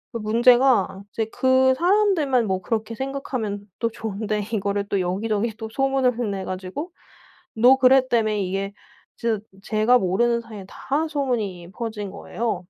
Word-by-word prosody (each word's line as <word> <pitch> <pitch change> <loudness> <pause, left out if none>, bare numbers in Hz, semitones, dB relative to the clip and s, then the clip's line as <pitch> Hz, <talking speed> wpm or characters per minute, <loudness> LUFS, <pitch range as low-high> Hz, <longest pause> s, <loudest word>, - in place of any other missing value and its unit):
그 - - -1
문제가 235 -2 +3
이제 225 +2 -2
그 260 0 +4
사람들만 340 - +2
뭐 190 -1 -1
그렇게 225 +1 -2
생각하면 245 -6 -4
또 230 - 0
좋은데 215 -1 -3
이거를 200 -1 -1
또 200 - 0
여기 185 +5 -2
저기 220 +1 0
또 220 0 -6
소문을 255 -4 +1
내 195 -1 -4
가지고 190 - -5 0.6
"너 250 +4 +6
그랬다며." 255 -4 +4
이게 195 0 -2 0.4
진짜 225 -3 -1 0.2
제가 220 +4 +3
모르는 235 +6 +1
사이에 215 -4 -10
다 300 +9 -2
소문이 215 - -2
퍼진 215 -4 -5
거예요. 225 +2 -3
225 Hz, 305 characters per minute, -23 LUFS, 200-260 Hz, 0.6 s, 너